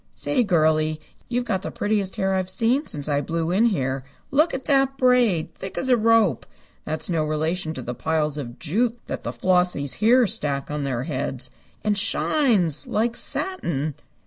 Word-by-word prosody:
Say, 265 -4 0
girlie, 155 -4 +2 0.3
you've 245 0 -1
got 190 -5 -1
the - - -5
prettiest 205 -2 -1
hair 190 0 0
I've 185 -1 -1
seen 240 +9 +1
since 145 -1 -3
I 145 -1 +1
blew 165 +3 -2
in 205 +6 +3
here. 135 - 0 0.3
Look 310 +5 +3
at 265 - -4
that 270 -1 +2
braid! 240 -11 +2
Thick 190 - -8
as 260 - -1
a 250 - +6
rope! 225 - +2 0.4
That's 155 0 -2
no 165 -3 0
relation 155 +2 -2
to 130 - -5
the 125 - -4
piles 150 +1 -1
of 120 -3 -7
jute 225 +9 0
that - - -5
the - - -4
Flossies 180 -6 +1
here 240 +4 +5
stack 145 -7 -1
on 150 -1 -2
their 125 -3 -2
heads. 135 -3 -3 0.3
And 210 0 +1
shines! 200 - +2
Like 230 +2 0
satin." 160 - -1
180 Hz, 175 wpm, -23 LUFS, 150-230 Hz, 0.4 s, a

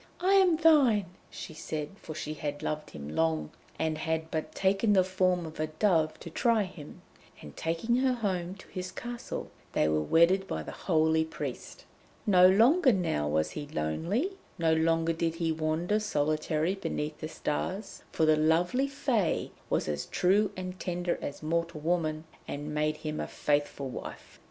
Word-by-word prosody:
'I 370 +3 +3
am 375 -4 +5
thine!' 255 - +4
she 160 - -8
said, 155 -1 -5
for 155 - -7
she 155 0 -4
had 145 -1 -5
loved 155 0 -3
him 70 -1 -8
long, 80 0 0 0.3
and 160 -1 -1
had 160 -1 -2
but 155 -1 -3
taken 195 +3 +2
the 190 -2 +5
form 185 -1 +1
of 160 -1 -9
a 155 - 0
dove 155 -1 +1
to 165 - -8
try 230 +3 +2
him. 180 -6 -10 0.4
And 75 - -11
taking 170 +9 0
her 260 0 +3
home 190 -6 -2
to 195 - -15
his 180 0 -5
castle, 240 +2 -6 0.2
they 75 - +3
were 75 0 +2
wedded 170 - +4
by - - -3
the - - -7
holy 160 -2 +2
priest. 160 - -7 0.4
No 185 -4 +7
longer 255 - +5
now 165 - 0
was 75 +1 +1
he 145 - -6
lonely, 165 - -1 0.3
no 165 -1 +3
longer 165 +1 +2
did 165 0 -1
he 165 -1 0
wander 160 +6 0
solitary 155 -2 0
beneath 155 -6 -4
the 155 - -4
stars, 185 +7 -3
for 160 - +2
the 155 0 +5
lovely 170 - +2
Fée 255 - 0 0.2
was - - 0
as 75 -1 -2
true 200 +3 +3
and 185 0 -6
tender 175 -1 -2
as 145 - -6
mortal 170 0 -1
woman, 155 -1 0 0.2
and 145 +1 -5
made 150 0 0
him 155 0 -4
a - - -2
faithful 145 -1 -1
wife. - - -9
165 Hz, 170 wpm, -29 LUFS, 155-195 Hz, 0.4 s, No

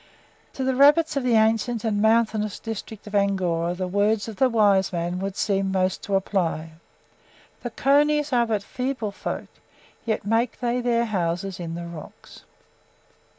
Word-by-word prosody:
To 265 - -4
the 260 0 +1
rabbits 295 +4 +5
of 275 - +1
the 245 -2 +2
ancient 225 +1 +2
and 210 -3 0
mountainous 220 -2 +2
district 220 -1 -7
of 210 - -10
Angora 180 -4 +1
the 185 0 -3
words 205 +3 +1
of 220 -3 -7
the 265 - +3
wise 205 -4 +3
man 175 0 -2
would 195 0 -4
seem 195 -2 0
most 185 -1 0
to 200 - 0
apply, 175 -5 -1 0.9
"The 240 - -4
conies 290 +3 +2
are 240 -1 +3
but 215 -3 -1
feeble 250 -4 -3
folk, - - -5 0.6
yet 220 -3 -2
make 225 +3 0
they 245 0 0
their 235 -1 +1
houses 185 -2 -2
in 165 -1 -5
the 170 0 -6
rocks." 170 -3 -11
210 Hz, 160 wpm, -24 LUFS, 190-235 Hz, 0.9 s, rabbits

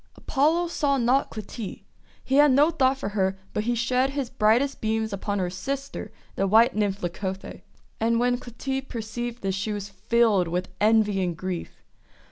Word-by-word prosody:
Apollo 320 +5 +1
saw 285 -4 +1
not 255 +3 +2
Clytie. 215 0 -7 0.4
He 265 - 0
had 295 -1 +7
no 290 +5 +5
thought 265 -4 +2
for 205 - -3
her, 195 -2 0 0.2
but 210 - -1
he 240 +1 +1
shed 250 +3 +1
his 275 -3 -3
brightest 235 +6 +2
beams 220 -1 -1
upon 200 +1 -2
her 180 -2 -1
sister, 275 +8 -5 0.2
the 195 - +1
white 220 +4 +5
Nymph 205 -2 -1
Leucothoe. 190 +2 -4 0.4
And 230 +1 +2
when 245 0 +2
Clytie 265 +3 -4
perceived 240 -1 -5
this 195 -1 0
she 200 +3 -2
was 205 -1 -4
filled 205 -1 +2
with 180 +2 -2
envy 210 -2 +3
and 175 -3 -2
grief. 185 -1 -5
225 Hz, 170 wpm, -25 LUFS, 200-260 Hz, 0.4 s, had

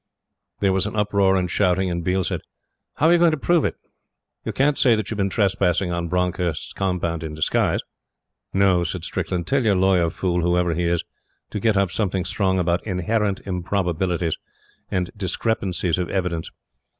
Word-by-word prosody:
There 95 -2 +3
was 95 +2 +1
uproar 100 -2 +2
and 90 -1 +1
shouting, 95 0 +1
and 85 0 -2
Biel 95 +2 +1
said: - - -2 0.5
"How 150 - +1
are 165 - +6
you 175 - +4
going 170 0 +6
to 155 - 0
prove 170 +3 +2
it? - - -1 0.7
You - - -3
can't 140 +2 +1
say 120 -4 +5
that 110 -1 -3
you've 110 - -3
been 100 0 +1
trespassing 95 -3 +1
on 85 0 -2
Bronckhorst's 90 -2 -1
compound 90 -4 -1
in 75 -1 -5
disguise!" 80 - +1 0.7
"No," 95 -2 +3
said 80 - -4
Strickland. 85 -2 -2
"Tell 135 -1 +1
your 105 -3 +3
lawyer 90 -2 +3
fool, 90 0 -1
whoever 90 0 +2
he 85 +2 -1
is, 85 0 +1 0.5
to 105 - -3
get 110 0 +2
up 100 -3 +2
something 95 -3 -1
strong 95 -2 0
about 85 -1 +1
'inherent 100 +1 -1
improbabilities' 90 -2 -1 0.5
and 90 -1 -1
'discrepancies 95 -3 -1
of 90 - -2
evidence.' 90 -4 -2
95 Hz, 175 wpm, -23 LUFS, 85-100 Hz, 0.7 s, are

